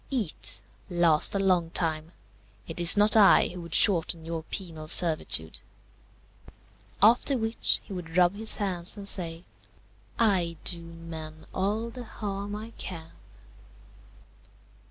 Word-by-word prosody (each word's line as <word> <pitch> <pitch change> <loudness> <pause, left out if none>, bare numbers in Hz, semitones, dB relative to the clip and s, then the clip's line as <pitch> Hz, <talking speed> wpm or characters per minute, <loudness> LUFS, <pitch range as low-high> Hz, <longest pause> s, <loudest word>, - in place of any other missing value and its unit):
eat! 230 - -1 0.3
last 170 -1 +3
a - - 0
long 180 -4 0
time! 160 -2 -3 0.6
It 165 - -3
is 170 +3 +9
not 210 +2 +3
I 210 -3 +5
who 180 0 -9
would 170 -1 -4
shorten 170 -4 +4
your 165 0 -5
penal 160 -2 -7
servitude." 155 - +3 1.4
After 240 +5 +3
which, 225 0 0
he 200 - -11
would 175 -2 -7
rub 180 0 +3
his 220 +2 -2
hands 185 -2 -3
and 200 -1 -9
say, 170 -3 -1 0.7
"I 185 -7 0
do 170 -2 0
men 160 -2 -11
all 215 +5 -3
the 250 +1 -9
harm 205 -2 -7
I 220 +2 -9
can." 165 -3 -8
180 Hz, 130 wpm, -26 LUFS, 165-205 Hz, 1.4 s, is